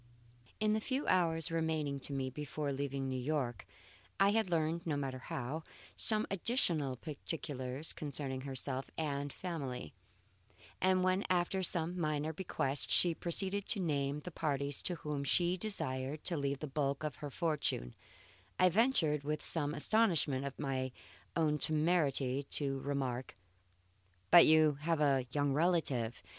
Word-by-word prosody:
In 215 0 +2
the 215 - 0
few 265 +5 -2
hours 165 -3 +2
remaining 160 -4 -1
to 140 - -5
me 135 -1 -2
before 150 0 -4
leaving 135 0 -3
New 130 -1 -2
York, 125 -6 -2 0.5
I 195 0 +6
had 220 -3 +1
learned 165 0 0
(no 150 -3 0
matter 135 -2 -3
how) 135 +5 -4 0.3
some 215 -1 +6
additional 170 - +1
particulars 145 -1 -4
concerning 140 -3 -4
herself 135 0 -4
and 145 -2 -2
family; 140 - -5 0.9
and 185 0 +3
when 185 +2 +2
after 185 +1 +1
some 175 0 +2
minor 155 -1 -1
bequests, 145 -5 0
she 175 -2 +5
proceeded 190 +4 -1
to 210 - +2
name 145 -4 -1
the 180 - -7
parties 140 -3 -1
to 180 - -1
whom 150 -3 -4
she 175 +5 +2
desired 145 -8 -4
to 175 - 0
leave 140 -2 -2
the - - -2
bulk 140 0 -1
of 150 -5 -3
her 145 - -6
fortune, 145 - -1 0.6
I 185 - +5
ventured, 175 - +2
with 150 +1 -2
some 150 -3 0
astonishment 160 -7 +2
at 140 - -5
my 130 -2 -2 0.4
own 150 -2 +1
temerity, 150 -5 +1
to 135 -2 -1
remark: 130 -3 -3 1.0
"But 175 - +10
you 155 -2 +5
have 165 0 0
a 135 -4 +2
young 145 0 +1
relative! 145 -8 0
150 Hz, 145 wpm, -34 LUFS, 135-170 Hz, 1.0 s, But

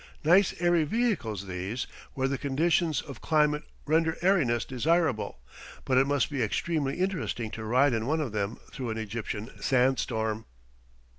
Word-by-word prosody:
Nice 180 +5 +4
airy 175 -2 +3
vehicles 150 - -1
these, 95 +6 -3 0.3
where 130 0 +1
the 135 0 -2
conditions 155 +1 +1
of 140 -3 -10
climate 150 -1 +2 0.2
render 160 +1 +2
airiness 150 - +3
desirable, 135 - 0 0.5
but 130 -1 +3
it 135 - +3
must 145 +1 +1
be 140 -3 -1
extremely 140 +5 0
interesting 170 - -2
to 110 - -6
ride 125 +5 +3
in 115 +1 -1
one 160 +3 +1
of 145 -7 -2
them 105 +1 -2
through 130 -4 -5
an 110 - -3
Egyptian 110 +1 -4
sand 130 0 +3
storm. 110 -1 -2
135 Hz, 155 wpm, -28 LUFS, 115-160 Hz, 0.5 s, Nice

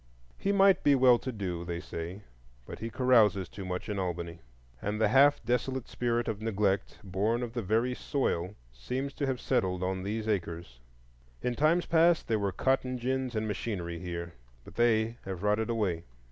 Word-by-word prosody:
He 200 - +1
might 195 -1 +5
be 145 - +5
well 125 -2 +6
to 130 - -4
do, 90 -6 -4
they 85 -1 -4
say; 85 +3 -6 0.4
but - - -8
he 115 - -4
carouses 115 -7 +3
too 100 - -8
much 90 -1 -4
in 105 -2 -2
Albany. 85 -2 -3 0.4
And 105 +1 -2
the 110 -2 +3
half 140 0 +5
desolate 125 +2 -1
spirit 120 -1 -1
of 110 -2 -3
neglect 100 -3 0
born 105 +5 0
of 115 -1 -5
the 120 - -2
very 115 +5 +1
soil 105 - -1 0.2
seems 130 - -4
to 140 - -2
have 130 -2 -1
settled 90 -1 0
on 95 0 -1
these 105 +3 -3
acres. 85 - -3 0.6
In 125 - 0
times 155 +7 +2
past 165 0 +3
there 110 -2 +1
were 100 -1 0
cotton 130 +3 0
gins 130 0 -2
and 110 0 -1
machinery 90 -5 -3
here; 85 -1 -5 0.3
but - - -12
they 115 -1 +2
have 95 -1 -5
rotted 105 +2 +1
away. 100 -8 0
110 Hz, 180 wpm, -30 LUFS, 95-125 Hz, 0.6 s, well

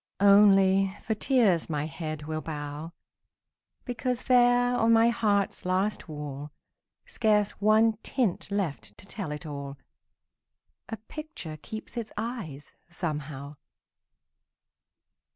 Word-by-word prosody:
Only, 195 -1 +5
for 220 - -1
tears 215 - +2
my 150 -1 -1
head 155 0 -5
will 155 0 -3
bow, 150 +1 -6 0.9
Because 250 0 -2
there 245 -1 +4
on 230 -1 +3
my 230 +1 +6
heart's 205 -5 0
last 185 0 -1
wall, 150 -1 -6 0.6
Scarce 210 -2 +2
one 215 +1 +4
tint 235 -10 -1
left 145 - -3
to - - -13
tell 195 -5 -5
it 150 +3 -6
all, 140 -2 -6 1.1
A 225 - -4
picture 220 - -8
keeps 220 +8 -9
its 230 -2 -4
eyes, 210 - -5 0.2
somehow. 150 -4 -5
195 Hz, 110 wpm, -28 LUFS, 150-225 Hz, 1.1 s, my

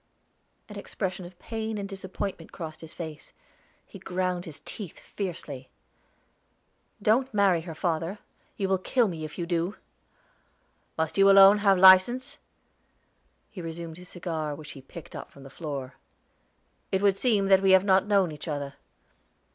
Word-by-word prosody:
An - - -10
expression 185 -2 -4
of 175 0 -17
pain 220 +2 -4
and 200 -1 -4
disappointment 190 -3 -6
crossed 155 -2 -8
his 160 -1 -10
face; 160 -3 -8 0.5
he 195 - -12
ground 180 -1 -2
his 160 -4 -7
teeth 195 -7 -7
fiercely. 155 -9 -6 1.3
"Don't 240 +6 +2
marry 195 -5 +4
her, 165 -1 -8
father; 165 +3 -2 0.4
you 195 - 0
will 190 -1 +1
kill 240 +5 +2
me 165 -4 -5
if 155 - -7
you 175 - -2
do!" 175 +3 -1 1.2
"Must 160 +4 -1
you 195 0 +7
alone 195 +1 +8
have 200 -2 +4
license?" 240 +10 +6 1.1
He 200 -4 -8
resumed 165 0 -7
his 180 0 -12
cigar, 160 -4 -4
which 150 0 -10
he 135 - -11
picked 150 +4 -11
up - - -7
from 140 - -15
the 135 - -12
floor. 140 -4 -6 1.0
"It 190 +1 0
would 200 -1 +4
seem 210 -3 +2
that 190 -1 +6
we 195 - +3
have 190 0 +6
not 190 0 +4
known 195 -5 +3
each 150 +3 -9
other. 145 -2 -4
185 Hz, 155 wpm, -27 LUFS, 160-195 Hz, 1.3 s, alone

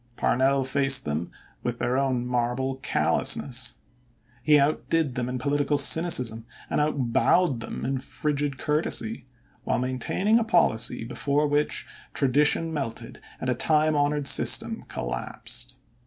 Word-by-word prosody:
Parnell 135 +1 +1
faced 135 0 +2
them 75 +3 -3 0.3
with 120 -1 -3
their 125 - -1
own 130 -2 0
marble 125 +2 -2
callousness. 130 -1 0 0.7
He 150 +3 +4
outdid 145 +1 0
them 125 -1 -3
in 125 - -3
political 145 +3 0
cynicism 125 -7 +4 0.2
and - - +1
out 140 -6 -1
bowed 175 -9 +2
them 110 - -6
in 135 0 -2
frigid 140 +1 -3
courtesy, 155 +10 -1 0.4
while - - -1
maintaining 130 - 0
a - - 0
policy 170 - +2
before 140 +5 -1
which 145 0 0 0.3
tradition 150 +4 +2
melted 115 -6 -5 0.2
and - - -5
a 130 - +2
time 155 +4 +2
honored 145 0 0
system - - +3
collapsed. 115 - -4
135 Hz, 130 wpm, -25 LUFS, 125-150 Hz, 0.7 s, He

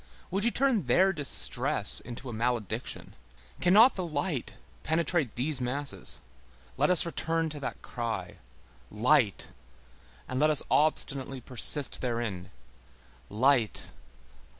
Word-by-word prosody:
Would 195 +2 -1
you 235 - +3
turn 240 - 0
their 190 +10 +3
distress 145 -6 +3
into 120 +3 -10
a 120 - -6
malediction? 115 -2 -4 0.5
Cannot 210 +8 +5
the 185 - -5
light 150 -4 -4 0.3
penetrate 160 -4 -1
these 135 +2 -3
masses? 135 +3 -3 0.5
Let 145 +3 +1
us 180 -1 +3
return 165 -1 -2
to 150 -1 -7
that 140 - -7
cry: 115 -7 -6 0.5
Light! 115 0 +1 0.8
and 130 - -4
let 155 +2 +3
us 150 - +2
obstinately 135 -3 +1
persist 130 +3 +4
therein! 115 -8 -4 0.8
Light! 120 +1 +1
140 Hz, 115 wpm, -28 LUFS, 120-160 Hz, 0.8 s, Cannot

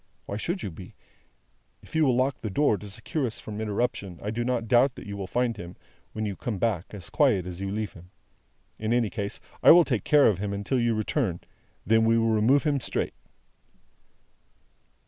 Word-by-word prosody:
Why 100 - -5
should 175 - -3
you 95 - -4
be? 90 +3 -11 0.9
If - - -17
you 160 -1 +4
will 130 -3 +3
lock 130 +1 0
the 110 - -3
door 140 +3 +2
to 105 0 -9
secure 135 +7 -3
us 110 - -6
from 105 0 -6
interruption, 105 -4 -2
I 105 - -2
do 120 +2 -2
not 120 -2 -1
doubt 125 +3 +4
that - - -10
you 100 0 -6
will 100 -2 -5
find 120 +1 0
him, 90 -2 -9 0.4
when 110 0 -3
you 100 -2 -3
come 110 0 -4
back, 100 -4 0
as 95 -5 -8
quiet 110 - +3
as 90 0 -7
you 100 - -2
leave 105 +1 -3
him. 90 +1 -14 0.7
In 110 +1 0
any 120 -4 +1
case, 100 -2 -4 0.2
I - - +7
will 175 0 +9
take 120 -7 -1
care 150 -2 +5
of 100 -5 +3
him 100 0 -2
until 100 +6 -1
you 120 -1 +2
return, 110 - 0
and - - -16 0.4
then 110 +2 +4
we 115 0 +4
will 115 0 +2
remove 115 +6 +3
him 145 -3 +1
straight." - - -2
110 Hz, 210 wpm, -27 LUFS, 100-125 Hz, 0.9 s, will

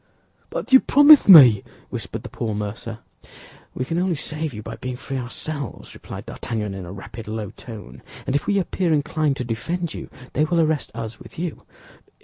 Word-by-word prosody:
"But - - -4
you 265 - +11
promised 290 -2 +7
me—" 130 - +10 0.3
whispered - - -5
the - - -8
poor 110 -2 -3
mercer. 105 +2 -5 0.7
"We 130 - -2
can 165 +5 -1
only 180 -1 +1
save 155 +1 -3
you 105 -3 -8
by - - -7
being 130 -1 -5
free 135 +1 -5
ourselves," 140 +2 -6
replied - - -9
D'Artagnan, 105 -4 -4
in 95 -2 -7
a - - -8
rapid, 100 +3 -9
low 110 -2 -4
tone; 105 - -11 0.2
"and 135 - -1
if 145 - -1
we 200 - +2
appear 185 -2 0
inclined 150 -1 +1
to - - -2
defend 165 +9 -3
you, - - -8 0.2
they 150 - +2
will 170 +2 +1
arrest 155 -2 +1
us 115 -1 -6
with - - -14
you." 170 -1 -5
135 Hz, 185 wpm, -22 LUFS, 110-160 Hz, 0.7 s, you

